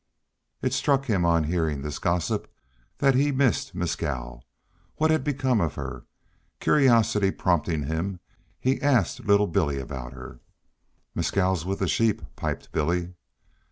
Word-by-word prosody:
It -, -, 0 dB
struck 140 Hz, -1 st, +2 dB
him 100 Hz, -8 st, +1 dB
on 85 Hz, -1 st, +3 dB
hearing 80 Hz, -3 st, -1 dB
this 75 Hz, 0 st, -4 dB
gossip 85 Hz, -1 st, -1 dB, 0.5 s
that 135 Hz, -1 st, +4 dB
he 135 Hz, +3 st, +3 dB
had 140 Hz, -2 st, -1 dB
missed 135 Hz, -5 st, +1 dB
Mescal. 65 Hz, -8 st, -3 dB, 0.5 s
What 155 Hz, +1 st, +2 dB
had 155 Hz, -4 st, +2 dB
become 130 Hz, -5 st, +1 dB
of 80 Hz, -4 st, -1 dB
her? 65 Hz, -4 st, -6 dB, 0.5 s
Curiosity 115 Hz, -8 st, +4 dB
prompting 85 Hz, -5 st, 0 dB
him, 85 Hz, +6 st, -3 dB, 0.4 s
he 130 Hz, +2 st, 0 dB
asked 130 Hz, -, +2 dB
little 100 Hz, 0 st, +4 dB
Billy 80 Hz, -6 st, 0 dB
about 65 Hz, -2 st, -6 dB
her. 65 Hz, -1 st, -10 dB, 0.7 s
"Mescal's 95 Hz, -3 st, 0 dB
with 95 Hz, +1 st, -1 dB
the 95 Hz, -, -1 dB
sheep," 110 Hz, +4 st, +1 dB
piped -, -, -4 dB
Billy. 85 Hz, +3 st, -1 dB
90 Hz, 140 wpm, -26 LUFS, 75-120 Hz, 0.7 s, that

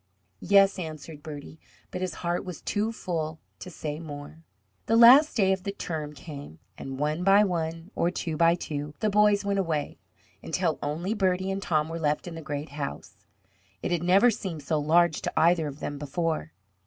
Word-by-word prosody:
"Yes," 195 Hz, -, +4 dB
answered 155 Hz, -2 st, -7 dB
Bertie; 150 Hz, 0 st, -9 dB, 0.3 s
but 180 Hz, -, -5 dB
his 185 Hz, -3 st, -3 dB
heart 175 Hz, +1 st, 0 dB
was 180 Hz, -3 st, -7 dB
too 215 Hz, +2 st, -1 dB
full 160 Hz, -7 st, -4 dB, 0.2 s
to 185 Hz, -, -8 dB
say 150 Hz, -3 st, -5 dB
more. 150 Hz, 0 st, -9 dB, 0.5 s
The 225 Hz, -, +3 dB
last 250 Hz, +6 st, +8 dB
day 190 Hz, -3 st, +4 dB
of 190 Hz, -, -3 dB
the 200 Hz, -, -3 dB
term 155 Hz, -6 st, -5 dB
came, 145 Hz, -, -10 dB, 0.2 s
and 135 Hz, 0 st, -7 dB
one 150 Hz, +4 st, -1 dB
by 195 Hz, +2 st, +6 dB
one, 165 Hz, -1 st, -3 dB
or 170 Hz, -, +1 dB
two 170 Hz, -3 st, -3 dB
by 170 Hz, +2 st, +4 dB
two, 150 Hz, -3 st, -5 dB
the 215 Hz, -, +1 dB
boys 210 Hz, 0 st, +4 dB
went 200 Hz, 0 st, +1 dB
away, 160 Hz, -6 st, -2 dB, 0.4 s
until -, -, -1 dB
only 165 Hz, +8 st, -2 dB
Bertie 190 Hz, -2 st, 0 dB
and 195 Hz, +1 st, -3 dB
Tom 155 Hz, -5 st, +1 dB
were 165 Hz, +1 st, -5 dB
left 150 Hz, +1 st, 0 dB
in 175 Hz, -, -6 dB
the 165 Hz, -, -7 dB
great 145 Hz, 0 st, -5 dB
house. 140 Hz, -, -7 dB, 0.6 s
It -, -, -2 dB
had 175 Hz, -2 st, +1 dB
never 195 Hz, +7 st, +5 dB
seemed 175 Hz, -8 st, -5 dB
so 155 Hz, +2 st, 0 dB
large 160 Hz, +1 st, +3 dB
to -, -, -3 dB
either 165 Hz, -1 st, +3 dB
of 145 Hz, 0 st, -8 dB
them 145 Hz, -1 st, -4 dB
before. 150 Hz, -, -2 dB
165 Hz, 190 wpm, -27 LUFS, 150-190 Hz, 0.6 s, last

